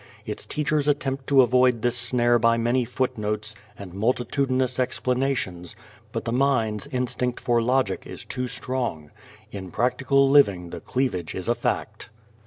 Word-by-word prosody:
Its - - -6
teachers 150 -1 0
attempt 135 -2 -1
to 135 -2 +6
avoid 125 -1 +3
this 120 0 +2
snare 120 0 +3
by 115 0 +3
many 120 +2 +1
footnotes 110 -4 -2 0.2
and 95 -3 -9
multitudinous 130 +4 0
explanations, 125 -9 -1 0.4
but - - -4
the 115 - -2
mind's 115 -5 +1
instinct 125 -1 -2
for 120 -1 +1
logic 125 -4 0
is - - -8
too 125 -1 -3
strong. 120 - -4 0.4
In 95 -2 -7
practical 130 +5 +2
living 100 -12 +4
the - - -6
cleavage 120 -11 -2
is 95 - -5
a 120 - +3
fact. 110 -2 -3
125 Hz, 145 wpm, -24 LUFS, 110-130 Hz, 0.4 s, to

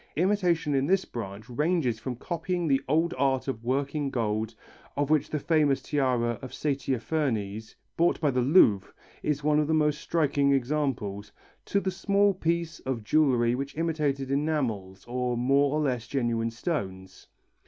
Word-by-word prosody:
Imitation 175 -4 +1
in 135 0 +1
this 190 +2 +2
branch 105 -2 -7
ranges 145 -3 0
from 125 +2 -4
copying 175 +5 -3
the 135 -2 +2
old 165 +3 +2
art 135 -1 +1
of 115 -4 -4
working 140 +3 -1
gold, 110 -2 -2 0.4
of 145 +1 0
which 155 -2 +2
the 155 - -1
famous 150 -2 +2
tiara 125 -5 0
of 130 - -8
Saitaphernes, 125 -6 -2 0.2
bought 170 +1 +2
by 150 -3 +2
the 125 -1 +1
Louvre, 120 - +4 0.3
is 150 -1 -1
one 150 0 +3
of 150 - +1
the 160 - +2
most 150 -1 +1
striking 145 -4 +2
examples, 120 -7 -1 0.3
to 200 - +1
the 190 -1 -2
small 200 +2 +2
piece 170 -2 -2
of 130 -4 -4
jewellery 120 -2 +3
with 135 +3 -4
imitated 150 -5 -1
enamels 125 -11 -1
or 125 0 -1
more 135 +3 +3
or - - +1
less 125 -5 -1
genuine 115 -4 0
stones. 95 - -5
140 Hz, 155 wpm, -27 LUFS, 120-155 Hz, 0.4 s, Louvre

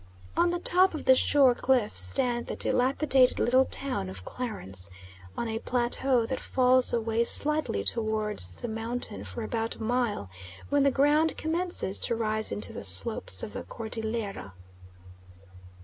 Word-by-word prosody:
On 350 - +2
the 350 - -2
top 360 0 +4
of 310 - -7
the 260 - +6
shore 265 0 +3
cliffs 245 -3 0
stands 245 -3 0
the - - -4
dilapidated 265 0 +2
little 255 +2 +2
town 260 - -4
of 95 -1 -9
Clarence, 95 - -4 0.5
on 235 - -3
a 225 0 -4
plateau 245 0 0
that 260 +2 -4
falls 255 0 +2
away 230 0 0
slightly 295 - +3
towards 215 - 0
the - - -7
mountain 225 - -4
for 95 0 -7
about 225 - -3
a - - -9
mile, 235 - -2 0.4
when 285 -1 +2
the 280 - +4
ground 295 +4 +1
commences 330 - -1
to 235 - 0
rise 220 -1 -1
into 100 -1 -2
the - - -8
slopes 90 0 +4
of 105 - -7
the - - -6
Cordillera. 220 - -6
235 Hz, 150 wpm, -27 LUFS, 215-265 Hz, 0.5 s, the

